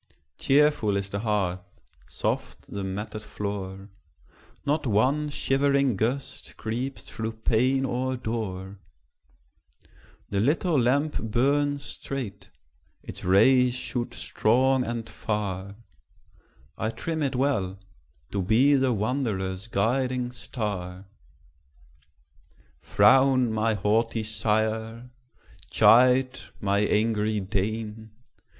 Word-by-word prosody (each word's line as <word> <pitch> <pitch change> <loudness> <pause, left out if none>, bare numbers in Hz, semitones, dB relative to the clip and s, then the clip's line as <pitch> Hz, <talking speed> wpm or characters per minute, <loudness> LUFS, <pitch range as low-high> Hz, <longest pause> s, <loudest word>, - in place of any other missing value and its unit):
Cheerful 140 -8 +3
is 100 0 -4
the 100 - -2
hearth, 100 -3 -2 0.3
soft - - -4
the 100 -1 -3
matted 105 +3 -5
floor; 100 -2 -6 0.8
Not 150 0 0
one 130 +8 +2
shivering 140 -2 +1
gust 120 +7 -3
creeps 125 +5 -4
through 110 0 -5
pane 125 +4 +1
or 130 +1 -2
door; 100 -5 -5 1.5
The 100 - 0
little 150 - +2
lamp 140 +5 +1
burns 140 +5 +1
straight, 130 -8 -6 0.5
its - - -7
rays 125 +7 +4
shoot 125 -1 -3
strong 130 +3 +2
and 115 -2 -4
far: 100 -2 -4 1.0
I 110 - 0
trim 160 +7 -4
it 140 -3 -1
well, 115 -9 0 0.5
to 100 - -1
be 115 +10 +4
the 130 -2 +3
wanderer's 105 -4 -2
guiding 125 +3 0
star. 100 -7 -5 1.7
Frown, 125 - +4
my 110 0 +1
haughty 110 +3 +1
sire! 110 +2 -1 0.6
chide, 130 +2 +5 0.2
my 100 0 +1
angry 105 0 +1
dame! 110 +3 -3
115 Hz, 95 wpm, -26 LUFS, 100-130 Hz, 1.7 s, chide